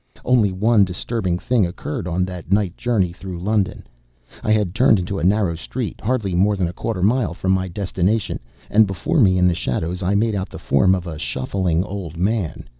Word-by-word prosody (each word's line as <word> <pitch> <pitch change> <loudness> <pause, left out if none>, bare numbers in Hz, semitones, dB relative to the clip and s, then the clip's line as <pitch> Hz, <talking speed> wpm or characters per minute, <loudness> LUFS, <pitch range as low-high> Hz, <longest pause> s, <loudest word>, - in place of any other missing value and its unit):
Only 120 -6 +3
one 105 +3 +3
disturbing 95 0 -2
thing 115 +3 +1
occurred 85 0 -5
on 90 +1 0
that 90 -2 -8
night 100 -3 +2
journey 105 -8 0
through 95 -1 -7
London. 100 +1 -1 0.6
I 110 - 0
had 105 -5 +2
turned 115 0 +4
into 95 +2 -3
a - - -4
narrow 95 -1 +2
street 115 +7 -5
hardly 110 -5 -1
more 100 +4 +3
than 95 -3 0
a 85 - -5
quarter 105 -3 -3
mile 115 -3 +2
from 95 +1 -1
my 95 0 +1
destination; 95 +3 -1 0.3
and 110 0 +5
before 95 - -1
me, 95 -7 +5
in 90 0 +4
the 90 - +3
shadows, 85 +3 -2
I 95 +2 +1
made 110 +2 +2
out 95 -2 -3
the - - -9
form 95 +7 +3
of 90 -2 -4
a 80 -3 -6
shuffling 85 +3 -1
old 95 -5 -6
man. 95 - -1
95 Hz, 200 wpm, -21 LUFS, 90-105 Hz, 0.6 s, and